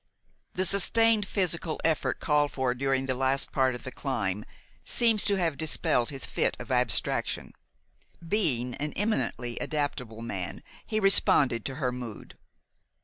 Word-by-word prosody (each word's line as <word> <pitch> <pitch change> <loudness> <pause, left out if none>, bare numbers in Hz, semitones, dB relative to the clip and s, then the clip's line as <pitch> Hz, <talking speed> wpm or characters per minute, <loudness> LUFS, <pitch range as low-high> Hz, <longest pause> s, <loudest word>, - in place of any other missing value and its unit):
The 185 - +1
sustained 210 +2 +3
physical 170 -5 -1
effort 160 -1 0
called 150 -1 +1
for 130 -2 0
during 135 +1 0
the 130 - 0
last 135 +1 0
part 130 -2 +1
of 125 - -9
the 130 - -6
climb 105 -9 -3 0.4
seemed 230 -3 +3
to 205 0 +1
have 165 -6 -1
dispelled 150 -6 +1
his 135 -3 -4
fit - - -1
of - - -8
abstraction. - - 0 0.7
Being 140 - +2
an 150 +4 -4
eminently 160 - -1
adaptable 125 -7 -3
man, 95 -6 -5 0.2
he 215 - 0
responded 145 - +4
to 135 - -3
her 130 -3 -1
mood. 125 -4 -8
140 Hz, 145 wpm, -28 LUFS, 125-180 Hz, 0.7 s, responded